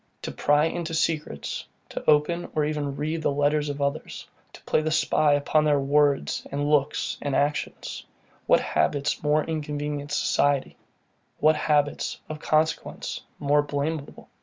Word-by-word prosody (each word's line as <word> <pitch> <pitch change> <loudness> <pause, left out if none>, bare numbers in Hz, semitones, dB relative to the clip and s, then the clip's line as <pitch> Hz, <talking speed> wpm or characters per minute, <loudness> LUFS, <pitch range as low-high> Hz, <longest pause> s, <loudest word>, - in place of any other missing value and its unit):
To - - -3
pry 145 +1 +3
into 165 0 -3
secrets, 155 - -2 0.3
to - - -6
open 155 +3 +2
or 155 -1 +2
even 145 -2 -2
read 155 +3 -2
the - - +1
letters 145 +1 +1
of 145 0 -2
others, 140 +3 -3 0.3
to - - -15
play - - +1
the 155 - -1
spy 155 -1 +3
upon 145 +2 +2
their 150 -2 +3
words 140 0 +2
and 145 +1 -1
looks 150 -1 +1
and 140 -2 -1
actions; 145 +2 -2 0.4
what - - +5
habits 140 - 0
more 150 +1 +2
inconvenient 150 -2 -3
in 145 - -10
society? 145 -1 +1 0.6
What 155 +1 +5
habits, 145 -1 0
of 155 -1 -5
consequence, 155 +1 -1 0.2
more 145 +1 +3
blameable? 145 +1 -4
150 Hz, 150 wpm, -25 LUFS, 145-155 Hz, 0.6 s, what